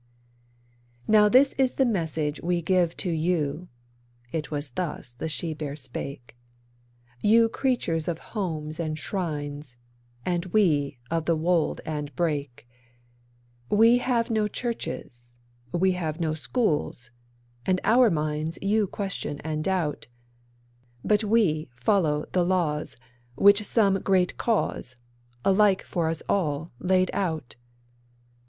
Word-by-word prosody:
'Now 210 -1 +6
this 265 +4 +5
is 260 -1 +3
the 265 - +2
message 160 - -1
we 175 0 0
give 175 0 +1
to 180 - -1
you' 160 0 -1 0.6
(it 160 -2 -3
was 145 -2 -4
thus 150 -4 -4
the 140 +6 -5
she 160 +1 -3
bear 150 -2 -5
spake): 130 -2 -7 0.9
'You 225 +2 +5
the 225 - +2
creatures 225 - -1
of 170 -2 -1 0.2
homes 160 -7 -3
and 155 -2 -2
shrines, 145 -5 -4 0.5
and 175 -1 0
we 155 -9 +2
of 165 -1 0
the 165 - +2
wold 165 0 +1
and 150 -3 -4
brake, 145 -6 -2 1.0
We 230 +3 +5
have 240 -2 0
no 215 -1 +2
churches, 120 - -6 0.4
we 185 +2 +2
have 165 -3 -3
no 160 -2 0
schools, 155 - -1 0.6
and 185 -1 +2
our 235 +3 +5
minds 155 -1 -1
you 205 +1 +1
question 195 -7 -4
and 155 -1 -3
doubt, 180 -5 -1 1.0
But 210 0 +3
we 200 - +2
follow 150 - +1
the 180 - +2
laws 170 -5 0 0.4
which 200 +1 +6
some 200 -2 +2
Great 185 -2 +2
Cause, 205 - -1 0.5
alike 195 0 +4
for 170 -3 -1
us 165 0 -1
all, 160 -4 0
laid 185 0 +2
out. 160 -9 -2
170 Hz, 125 wpm, -26 LUFS, 150-200 Hz, 1.0 s, Now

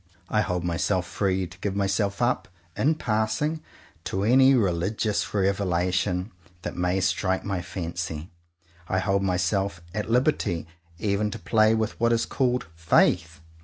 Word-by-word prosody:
I 105 - +2
hold 90 -3 -1
myself 90 +2 0
free 95 0 0
to 85 -2 -13
give 100 -2 -2
myself 100 +2 0
up, 125 +1 +1 0.3
in 155 +4 +2
passing, 115 +6 -1 0.4
to 95 - -2
any 130 +4 +6
religious 100 +1 0
revelation 95 0 0 0.3
that - - -4
may 90 +1 +1
strike 95 +1 0
my 100 -3 -2
fancy. 85 -2 -5 0.6
I 95 - 0
hold 95 +1 +1
myself 95 0 0
at 105 +1 -3
liberty 125 - +1 0.3
even 105 +2 0
to - - -5
play 110 +5 +3
with 110 -1 -2
what 115 0 +3
is 115 - +1
called 125 -2 0
"Faith." 85 0 +2
100 Hz, 140 wpm, -26 LUFS, 90-110 Hz, 0.6 s, any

